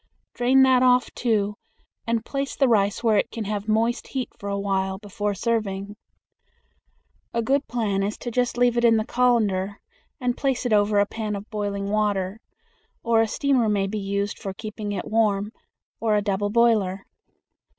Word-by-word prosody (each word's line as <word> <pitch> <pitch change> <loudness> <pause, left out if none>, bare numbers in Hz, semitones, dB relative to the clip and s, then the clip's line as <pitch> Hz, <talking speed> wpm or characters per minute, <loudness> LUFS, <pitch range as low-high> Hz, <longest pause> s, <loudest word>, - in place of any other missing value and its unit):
Drain 260 +2 +4
that 260 -1 +5
off, 250 -2 +3
too, 210 -4 0 0.5
and 230 0 0
place 275 0 -3
the 270 - +3
rice 205 -1 +2
where 220 -3 +3
it - - +1
can 230 - -5
have 210 0 -4
moist 225 +3 +1
heat 260 -2 -3
for 200 - -7
a 200 - -1
while 190 -1 -1
before 205 0 -3
serving. 205 -2 -2 1.4
A 230 - +1
good 275 +4 +1
plan 210 -5 -1
is 205 +2 -2
just 245 0 -1
to 245 - -4
leave 245 -1 +3
it 235 - +2
in 230 -1 +5
the 215 - -1
colander 215 -6 +1 0.4
and 250 -2 0
place 265 -3 -1
it 240 - +1
over 205 0 +3
a 205 - +5
pan 210 0 -4
of 200 +2 -8
boiling 200 -1 -3
water; 205 -1 0 0.6
or 230 -1 +3
a 225 - +2
steamer 255 -1 +1
may 200 -2 +1
be 210 +2 -3
used 200 +1 -2
for 195 -1 -6
keeping 215 0 -6
it 195 -3 -3
warm, 210 -2 +1 0.5
or 220 -2 +1
a 210 - +2
double 205 0 -1
boiler. 210 -4 +2
215 Hz, 180 wpm, -24 LUFS, 200-235 Hz, 1.4 s, that